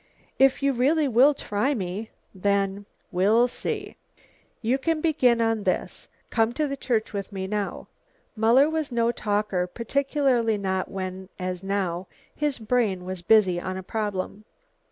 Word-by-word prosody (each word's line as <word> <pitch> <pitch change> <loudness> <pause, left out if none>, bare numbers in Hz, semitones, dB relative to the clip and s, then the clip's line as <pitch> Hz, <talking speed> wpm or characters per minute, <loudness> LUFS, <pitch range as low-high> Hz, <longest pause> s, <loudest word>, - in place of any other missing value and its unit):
"If 270 +1 +4
you 280 0 +3
really 285 +5 +2
will 265 +4 +5
try 260 +3 -1
me, 200 +2 -4 0.2
then 200 +1 0
" - - -42
"We'll 210 +7 +4
see. 250 - -4 0.7
You 250 +4 +1
can 325 +3 0
begin 260 -7 +3
on 225 -1 +1
this. - - -2 0.2
Come 225 0 +2
to 300 +3 0
the 275 - -3
church 235 -6 -1
with 200 0 -4
me 190 -1 -4
now." 205 0 -3 0.5
Muller 235 +6 +5
was 315 -3 -2
no 235 -1 +2
talker, 205 -5 -1
particularly 245 0 +1
not 190 -2 -2
when, 190 -1 -5
as 185 0 -4
now, 190 -2 -2 0.3
his 295 -2 -1
brain 215 -5 0
was 185 -1 -5
busy 185 -2 +4
on 185 +1 -4
a 190 - -6
problem. 205 0 -3
220 Hz, 155 wpm, -25 LUFS, 190-255 Hz, 0.7 s, will